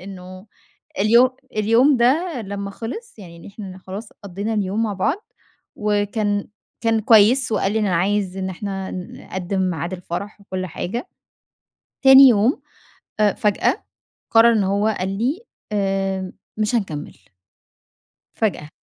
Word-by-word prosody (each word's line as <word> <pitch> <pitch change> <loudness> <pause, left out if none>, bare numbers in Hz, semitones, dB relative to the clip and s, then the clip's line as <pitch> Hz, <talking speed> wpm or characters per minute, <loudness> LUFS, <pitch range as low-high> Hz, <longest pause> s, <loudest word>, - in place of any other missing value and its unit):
إنّه 185 0 -10 0.5
اليوم 235 +5 +5 0.3
اليوم 230 +7 +4
ده 275 +5 +2
لمّا 200 0 -5
خلص، 240 - -8
يعني 170 -4 -11
إن 170 - -13
إحنا 195 -2 -9
خلاص 195 +4 -8 0.2
قضينا 200 +4 -3
اليوم 205 +1 -1
مع 220 -2 -1
بعض، 275 - -1 0.5
وكان 205 0 -1 0.3
كان 225 -1 +2
كويّس، 225 +4 +5
وقال 195 -2 +1
لي 220 - +1
إن 215 - +1
أنا 180 -3 +1
عايز 195 +1 0
إن 190 0 -3
إحنا 195 0 -5
نقدم 185 +1 -5
ميعاد 170 +1 -4
الفرح 185 +3 -6
وكل 185 -2 -5
حاجة. 230 - -5 0.9
تاني 270 0 +9
يوم 230 +3 +3 0.6
آآ 210 -1 +4
فجأة، 210 -1 0 0.5
قرر 230 +1 +6
إنّه 210 -4 +2
هو 210 +2 +2
قال 185 - -2
لي: 270 - 0 0.3
"آآ، 195 -2 -1 0.2
مش 215 +2 0
هنكمل." 160 -10 -3 1.2
فجأة. 185 -8 -1
205 Hz, 135 wpm, -21 LUFS, 190-225 Hz, 1.2 s, تاني